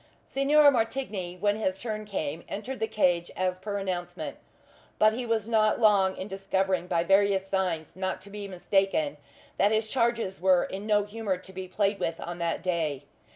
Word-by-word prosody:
Signor 285 +2 +5
Martigny, 225 -7 -2
when 205 +2 +2
his 190 -4 -1
turn 215 -1 -4
came, 165 -6 -3
entered 250 +6 -5
the 220 - 0
cage 175 -5 +1
as 185 0 -1
per 200 +1 -3
announcement; 185 -3 -4 0.6
but 215 0 +5
he 245 +1 -4
was 225 -2 0
not 215 -2 +3
long 200 -4 +4
in 185 - -5
discovering 190 -2 -1
by 170 -1 +1
various 195 +1 +3
signs 185 -5 -2
not 185 0 -2
to 200 +1 -12
be 205 0 -6
mistaken 185 -5 0 0.4
that 200 +2 +4
his 220 0 +1
charges 230 -6 0
were 185 -1 +4
in 195 +3 -6
no 210 -1 +3
humour 205 -2 -3
to 185 +1 -13
be 190 0 -6
played 200 +2 0
with 165 - -2
on 175 0 -6
that 170 0 -1
day. 160 -6 -1
195 Hz, 180 wpm, -28 LUFS, 180-215 Hz, 0.6 s, Signor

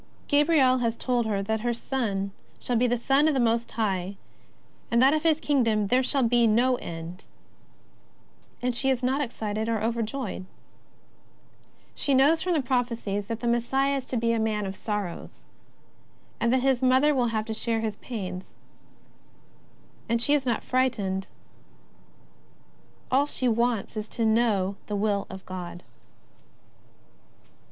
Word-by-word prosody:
Gabriel 285 -3 +4
has 230 -1 -1
told 245 -3 0
her 200 -2 -1
that 220 +2 -1
her 240 +1 -1
Son 205 -6 -2 0.3
shall 245 - -2
be 245 +2 +3
the 245 0 +1
Son 275 +5 +3
of 310 - +2
the - - +2
Most 235 0 +1
High, 195 -3 -1 0.7
that 255 +4 +5
of 310 - +1
His 320 -1 +3
Kingdom 230 -9 +1
there 255 +3 +4
shall 265 +1 +1
be 235 0 +4
no 245 +4 +3
end 170 +1 -8 0.7
— - - -34
and 250 0 +1
she 265 +3 0
is 255 -1 0
not 265 +3 +1
excited 220 -4 -3
or 225 -1 0
overjoyed. 230 -1 -3 1.5
She 280 - +1
knows 290 +5 +4
from 365 - 0
the 305 -5 +1
prophecies 230 -6 -1
that 230 -1 -4
the 240 - -1
Messiah 265 +4 +1
is 265 - -6
to 255 - -1
be 230 0 +1
a 230 - 0
Man 215 -2 0
of 190 0 -5
Sorrows, 205 -5 -5 0.9
and 235 - +2
that 260 0 +3
His 265 -1 +2
Mother 260 +3 +4
will 250 -3 +2
have 220 -1 -1
to 220 - -4
share 225 0 -1
His 215 -2 -3
pains 185 -6 -6 0.7
— - - -31
and 230 0 +2
she 285 +5 +2
is 280 -3 +1
not 235 - 0
frightened. 210 -7 0 1.8
All 275 +3 +3
she 255 - -1
wants 235 -2 0
is 215 0 -4
to 230 +1 -2
know 215 -4 +2
the 210 - -2
Will 200 -1 0
of 190 0 -9
God. 180 -1 -7
235 Hz, 160 wpm, -26 LUFS, 210-260 Hz, 1.8 s, that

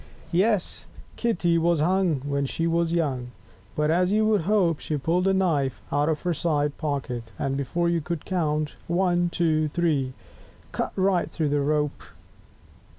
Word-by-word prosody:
2 170 - 0
Yes, 205 -2 0 0.3
Kitty 175 -8 +1
was 170 -1 +2
hung 175 -3 +2
When 140 -1 -1
she 165 - -2
was 170 0 +1
so 170 - -1
young; 130 -7 -1 0.4
But, 150 +1 +1
as 180 +3 +2
you 215 +1 +3
would 215 -3 +3
hope, 180 -7 +3
She 155 - -2
pulled 175 +6 +1
a 195 - +4
knife 150 -9 +1
out 145 +2 +2
of 155 -2 -1
her 175 - +1
side 150 -3 0
pocket, 130 -7 -3
and 135 0 -1
before 140 +6 -1
you 170 -1 +1
could 165 0 -4
count 155 -4 -1
ONE, 175 0 +2
TWO, 155 -3 +1
THREE, 150 -5 0 0.6
cut - - -2
right 190 -2 +1
through 155 -3 -1
the 145 0 +1
rope. 150 0 0
165 Hz, 170 wpm, -25 LUFS, 145-175 Hz, 0.6 s, a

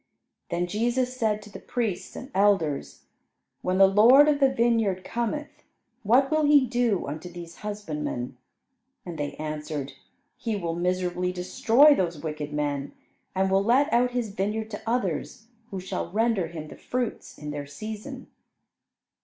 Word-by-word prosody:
Then 175 +1 0
Jesus 240 +6 0
said 215 -3 0
to 210 - -13
the - - -8
priests 225 -7 -3
and 260 - -8
elders, 190 -8 +1 0.6
"When 185 0 0
the 195 - +8
Lord 230 +9 +7
of 295 -1 +3
the 270 -2 +4
vineyard 230 -6 +1
cometh, 240 +8 -3 0.4
what 250 +6 +3
will 310 0 +3
he 290 -2 +6
do 240 -5 +1
unto 155 +5 -6
these 170 -1 -10
husbandmen?" 155 - -4 0.7
And 170 -3 -7
they 145 0 -2
answered, 150 -2 -4 0.4
"He 225 -3 -2
will 170 -4 -2
miserably 180 0 0
destroy 225 +10 +5
those 175 - -1
wicked 150 -1 -5
men, 145 -1 -2 0.4
and 190 0 +1
will 195 +1 +3
let 265 +8 +3
out 245 +1 +4
his 245 -3 -2
vineyard 215 +3 -2
to 205 - -6
others, 225 -1 -2 0.2
who 195 - -5
shall 185 0 -4
render 220 -4 +1
him 155 -2 -8
the - - -11
fruits 245 -2 -4
in 150 0 -6
their 145 -1 -5
season." 215 - -7
200 Hz, 155 wpm, -26 LUFS, 170-240 Hz, 0.7 s, the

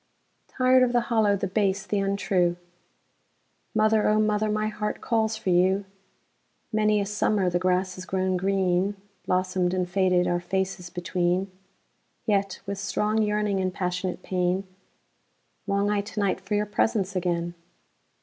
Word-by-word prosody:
Tired 255 0 +3
of 250 -1 +3
the 240 - +4
hollow, 210 -3 +4
the 195 - -2
base, 195 0 0
the 205 0 -1
untrue, 195 -3 +1 1.2
Mother, 215 0 +3
O 215 0 +3
mother, 215 0 +1
my 215 0 0
heart 210 0 -3
calls 220 -2 0
for 195 -4 -1
you! 190 +3 +3 0.9
Many 215 -1 +3
a 200 - 0
summer 205 -2 +1
the 175 - +1
grass 185 +1 +1
has 185 0 -8
grown 185 0 0
green, 190 +1 +1 0.3
Blossomed 185 0 +1
and 180 -1 0
faded, 180 -1 +2
our 175 - +1
faces 185 0 -3
between:Yet, 185 +3 -3
with 200 -1 -4
strong 210 +2 0
yearning 210 -2 0
and 185 0 0
passionate 180 -1 -3
pain, 180 +1 0 1.0
Long 200 +1 +1
I 205 -1 +1
to 205 +1 -6
night 195 -1 0
for 195 +2 -2
your 210 0 +1
presence 205 -2 0
again. 175 -1 -1
195 Hz, 145 wpm, -26 LUFS, 185-210 Hz, 1.2 s, the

